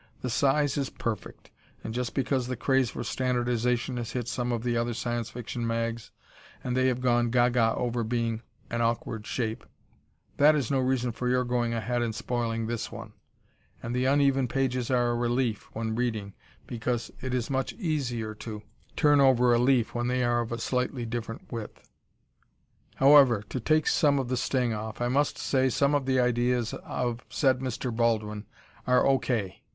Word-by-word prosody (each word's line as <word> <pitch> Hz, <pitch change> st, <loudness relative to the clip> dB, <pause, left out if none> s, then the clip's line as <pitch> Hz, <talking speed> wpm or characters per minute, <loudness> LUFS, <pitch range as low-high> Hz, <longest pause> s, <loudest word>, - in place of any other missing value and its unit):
The 125 Hz, -, -3 dB
size 140 Hz, +4 st, +2 dB
is 135 Hz, -, -1 dB
perfect 110 Hz, -5 st, -5 dB, 0.3 s
(and 110 Hz, -, -5 dB
just 125 Hz, 0 st, -3 dB
because 130 Hz, -2 st, 0 dB
the 130 Hz, -, -2 dB
craze 130 Hz, +1 st, +2 dB
for -, -, -5 dB
standardization 125 Hz, 0 st, 0 dB
has 120 Hz, -2 st, -4 dB
hit 120 Hz, -2 st, -3 dB
some 120 Hz, +1 st, -2 dB
of 115 Hz, -1 st, -2 dB
the 120 Hz, -1 st, 0 dB
other 120 Hz, 0 st, -1 dB
Science 120 Hz, -1 st, -2 dB
Fiction 120 Hz, 0 st, -5 dB
mags 115 Hz, 0 st, -2 dB, 0.5 s
and 125 Hz, -, -2 dB
they 130 Hz, 0 st, +3 dB
have 125 Hz, -1 st, 0 dB
gone 120 Hz, -1 st, +2 dB
ga 120 Hz, +1 st, +4 dB
ga 115 Hz, -2 st, +2 dB
over 120 Hz, -1 st, -1 dB
being 115 Hz, -1 st, -1 dB, 0.3 s
an 120 Hz, 0 st, -1 dB
awkward 115 Hz, -2 st, -1 dB
shape, 115 Hz, -3 st, -2 dB, 0.7 s
that 150 Hz, +2 st, +6 dB
is 140 Hz, -5 st, -1 dB
no 135 Hz, -, +2 dB
reason 130 Hz, -1 st, 0 dB
for 125 Hz, +2 st, -3 dB
your 125 Hz, 0 st, +2 dB
going 120 Hz, -1 st, 0 dB
ahead 120 Hz, +2 st, -1 dB
and 115 Hz, -2 st, -2 dB
spoiling 115 Hz, -2 st, -2 dB
this 115 Hz, 0 st, -3 dB
one) -, -, -9 dB, 0.7 s
and 120 Hz, +1 st, -3 dB
the 125 Hz, +1 st, +1 dB
uneven 135 Hz, -1 st, +3 dB
pages 125 Hz, -1 st, -1 dB
are 120 Hz, -2 st, +2 dB
a -, -, 0 dB
relief 120 Hz, -2 st, -1 dB
when 110 Hz, 0 st, -2 dB
reading 110 Hz, -5 st, -2 dB, 0.3 s
because 120 Hz, 0 st, -3 dB
it 130 Hz, -, -3 dB
is 125 Hz, 0 st, -1 dB
much 135 Hz, -1 st, 0 dB
easier 125 Hz, -, -2 dB
to 110 Hz, -1 st, -8 dB, 0.3 s
turn 145 Hz, -1 st, +4 dB
over 125 Hz, -2 st, +5 dB
a 120 Hz, -, +3 dB
leaf 125 Hz, -2 st, +2 dB
when 120 Hz, 0 st, -1 dB
they 125 Hz, 0 st, +1 dB
are 120 Hz, 0 st, +2 dB
of 115 Hz, -, -5 dB
a 115 Hz, -, -2 dB
slightly 125 Hz, +1 st, -1 dB
different 115 Hz, -1 st, -6 dB
width. 115 Hz, -3 st, -7 dB, 1.1 s
However, 135 Hz, -6 st, +6 dB
to 130 Hz, -, -3 dB
take 155 Hz, +6 st, +2 dB
some 145 Hz, -2 st, +3 dB
of 130 Hz, -3 st, -2 dB
the 130 Hz, -, 0 dB
sting 125 Hz, -2 st, 0 dB
off, 110 Hz, +1 st, -5 dB
I 120 Hz, 0 st, 0 dB
must 145 Hz, +3 st, +1 dB
say 130 Hz, -1 st, +1 dB
some 140 Hz, +3 st, +2 dB
of 140 Hz, -2 st, 0 dB
the 130 Hz, -1 st, +2 dB
ideas 125 Hz, -1 st, +1 dB
of 120 Hz, -1 st, -3 dB
said 130 Hz, -3 st, +2 dB
Mr. 125 Hz, -2 st, -3 dB
Baldwin 110 Hz, -2 st, 0 dB, 0.4 s
are 125 Hz, 0 st, +4 dB
O. 135 Hz, -1 st, +4 dB
K. 105 Hz, -7 st, -2 dB
120 Hz, 185 wpm, -28 LUFS, 115-130 Hz, 1.1 s, that